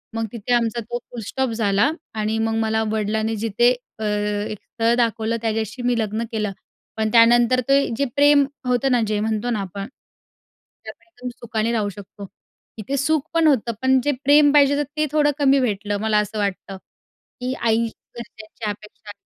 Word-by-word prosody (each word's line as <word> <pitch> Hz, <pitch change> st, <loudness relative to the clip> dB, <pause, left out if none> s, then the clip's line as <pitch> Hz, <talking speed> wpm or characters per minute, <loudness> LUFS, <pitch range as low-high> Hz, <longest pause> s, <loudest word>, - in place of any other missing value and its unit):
मग 225 Hz, 0 st, -1 dB
तिथे 235 Hz, +1 st, -3 dB
आमचा 235 Hz, -1 st, +1 dB
तो 240 Hz, +2 st, -5 dB
फुलस्टॉप 245 Hz, +2 st, -3 dB
झाला 210 Hz, +1 st, +2 dB, 0.2 s
आणि 220 Hz, 0 st, -1 dB
मग 225 Hz, 0 st, 0 dB
मला 220 Hz, 0 st, 0 dB
वडिलांनी 220 Hz, +1 st, -1 dB
जिथे 225 Hz, +3 st, +2 dB, 0.3 s
अ, -, -, -4 dB
एक 210 Hz, 0 st, -2 dB
स्थळ 230 Hz, 0 st, 0 dB
दाखवलं, 230 Hz, -1 st, 0 dB
त्याच्याशी 225 Hz, +2 st, -2 dB
मी 245 Hz, -1 st, +2 dB
लग्न 220 Hz, +1 st, -2 dB
केलं. 215 Hz, -3 st, -2 dB, 0.5 s
पण 220 Hz, 0 st, 0 dB
त्यानंतर 240 Hz, +2 st, +5 dB
ते 275 Hz, 0 st, +4 dB
जे 280 Hz, -, +1 dB
प्रेम 285 Hz, 0 st, +5 dB, 0.2 s
होतं 250 Hz, +2 st, +1 dB
ना, 245 Hz, -1 st, +3 dB
जे 210 Hz, -1 st, 0 dB
म्हणतो 220 Hz, +2 st, -1 dB
ना, 210 Hz, -4 st, -1 dB
त्यातनं 200 Hz, +6 st, -13 dB
एकदम 250 Hz, -6 st, -8 dB
सुखाने 230 Hz, -1 st, -2 dB
राहू 215 Hz, -3 st, 0 dB
शकतो. 200 Hz, 0 st, -11 dB, 0.5 s
इथे 270 Hz, +6 st, -3 dB
सुख 305 Hz, +2 st, +1 dB
पण 330 Hz, -1 st, +3 dB
होतं, 240 Hz, -5 st, +2 dB
पण 260 Hz, 0 st, +4 dB
जे 290 Hz, -, +2 dB
प्रेम 290 Hz, +1 st, +6 dB
पाहिजे 285 Hz, -1 st, +5 dB
तर 295 Hz, -, +1 dB
ते 305 Hz, -, +2 dB
थोडं 295 Hz, -1 st, +3 dB
कमी 275 Hz, -1 st, +4 dB
भेटलं. 205 Hz, -4 st, -1 dB
मला 220 Hz, -1 st, +1 dB
असं 210 Hz, +1 st, -3 dB
वाटतं, 195 Hz, -1 st, -3 dB
की 250 Hz, +6 st, -10 dB
आईची 230 Hz, 0 st, +1 dB, 0.3 s
घरच्यांची 220 Hz, -2 st, -8 dB
अपेक्षा 210 Hz, +1 st, -9 dB
225 Hz, 170 wpm, -21 LUFS, 215-250 Hz, 0.5 s, प्रेम